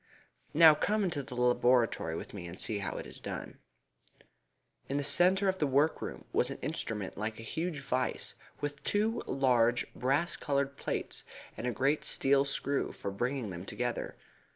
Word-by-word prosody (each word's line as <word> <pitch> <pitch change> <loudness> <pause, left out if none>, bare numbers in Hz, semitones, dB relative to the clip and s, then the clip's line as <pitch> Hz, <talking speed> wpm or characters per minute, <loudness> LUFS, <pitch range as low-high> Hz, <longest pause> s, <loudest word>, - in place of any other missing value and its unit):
Now 160 0 +9
come 210 +7 +1
into 165 -6 -1
the 130 -2 -9
laboratory 125 -7 +2
with - - -7
me 90 -4 -6
and 85 +2 -9
see 105 -2 -1
how 100 - -3
it - - -5
is - - -9
done." - - -6 1.3
In 140 - 0
the 145 - 0
centre 185 +7 +4
of 190 0 +1
the 150 - +2
workroom 145 +4 0
was - - +3
an - - -5
instrument 105 -3 -3
like 110 +1 -3
a - - -7
huge 160 +5 -3
vice, 130 -2 -1 0.3
with 145 -1 -4
two 215 +3 +1
large 120 -3 +3
brass 145 +6 0
coloured 140 -1 -1
plates, - - -3 0.3
and 125 - -4
a - - +1
great 140 +5 +1
steel 140 +1 +3
screw 140 0 -1
for 100 - -5
bringing 120 +1 -2
them 85 0 -6
together. 120 +4 -3
135 Hz, 170 wpm, -32 LUFS, 120-150 Hz, 1.3 s, Now